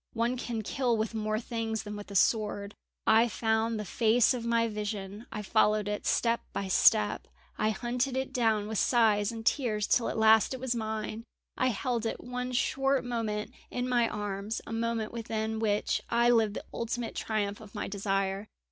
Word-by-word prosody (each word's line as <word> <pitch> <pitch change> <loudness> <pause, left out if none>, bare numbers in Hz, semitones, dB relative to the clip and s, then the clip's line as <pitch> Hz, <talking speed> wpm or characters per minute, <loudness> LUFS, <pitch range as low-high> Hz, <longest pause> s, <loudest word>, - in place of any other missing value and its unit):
"One 235 +2 0
can 235 -3 -4
kill 240 +1 0
with 220 +1 -2
more 215 -1 -1
things 225 -2 -3
than 210 0 -6
with 205 0 -8
a 200 - -8
sword. 205 0 +1 0.3
I 225 +2 +5
found 220 +1 0
the 210 - -4
face 230 +5 +3
of 245 -2 -4
my 230 0 +2
vision, 210 0 -5
I 210 - -4
followed 210 0 +2
it 210 0 -3
step 235 0 +2
by 195 -1 -3
step. 105 - +4 0.3
I 215 - +2
hunted 245 +5 -1
it 265 0 -3
down 220 -4 +1
with 220 -1 -1
sighs 220 -3 +3
and 225 -1 -7
tears 225 -6 +1
till 235 - +2
at - - -3
last 220 +3 +5
it - - -8
was 255 -1 -1
mine. 220 0 -3 0.3
I 255 - +1
held 240 -1 -1
it - - -4
one 250 0 -4
short 270 +1 +1
moment 220 -3 -3 0.2
in 250 0 -2
my 240 -2 +2
arms, 205 +1 -3
a - - -6
moment 230 -1 -1
within 220 -1 -3
which 210 -2 0
I 235 +1 +4
lived 220 -3 +3
the - - -6
ultimate 235 0 -3
triumph 205 -1 -2
of 215 0 -13
my 210 - -3
desire. 195 0 -1
220 Hz, 185 wpm, -30 LUFS, 210-235 Hz, 0.3 s, I